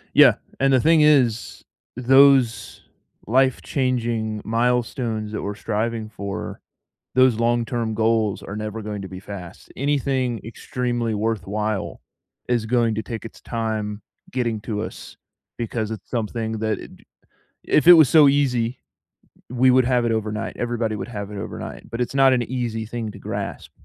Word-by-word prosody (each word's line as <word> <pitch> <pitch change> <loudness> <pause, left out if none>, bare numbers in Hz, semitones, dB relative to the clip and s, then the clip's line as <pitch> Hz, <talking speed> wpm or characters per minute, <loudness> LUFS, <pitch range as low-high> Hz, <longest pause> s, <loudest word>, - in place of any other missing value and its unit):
Yeah. - - +8 0.2
And 135 0 +3
the 130 - +5
thing 160 +2 +4
is, 130 -7 +2 0.3
those 135 -1 +4 0.4
life-changing 120 -3 0
milestones 115 -1 -1
that 105 - -4
we're 105 - -3
striving 110 +1 -2
for, 100 -2 -6 0.6
those 130 -2 +5
long-term 115 0 0
goals 110 -2 +1
are 100 - -7
never 110 +1 -5
going 105 -1 -5
to 95 - -6
be 95 0 -8
fast. 95 -3 -10
Anything 135 -4 0
extremely 120 0 -3
worthwhile 105 -1 -2 0.5
is 120 -3 0
going 115 -1 +1
to 110 - -1
take 115 -2 -6
its 115 - -11
time 110 -2 -3 0.3
getting 120 -4 -1
to 110 -2 -3
us, - - -8 0.4
because 110 -1 -3
it's 110 -4 -8
something 115 -1 -2
that 110 -1 -1 0.9
if 155 - +2
it 175 - +12
was 160 -5 +7
so 155 -3 +7
easy, 125 -4 +1 0.7
we 125 +1 +4
would 130 0 +4
have 125 -1 +2
it 115 - +1
overnight, 110 0 -2
everybody 120 -2 -1
would 95 -1 -5
have 105 -3 -6
it 105 - -7
overnight, - - -7
but 115 +1 -4
it's 125 - -2
not 135 -1 +6
an 120 -2 +1
easy 120 -3 -3
thing 110 -1 -5
to - - -12
grasp, - - -5
115 Hz, 150 wpm, -22 LUFS, 110-125 Hz, 0.9 s, it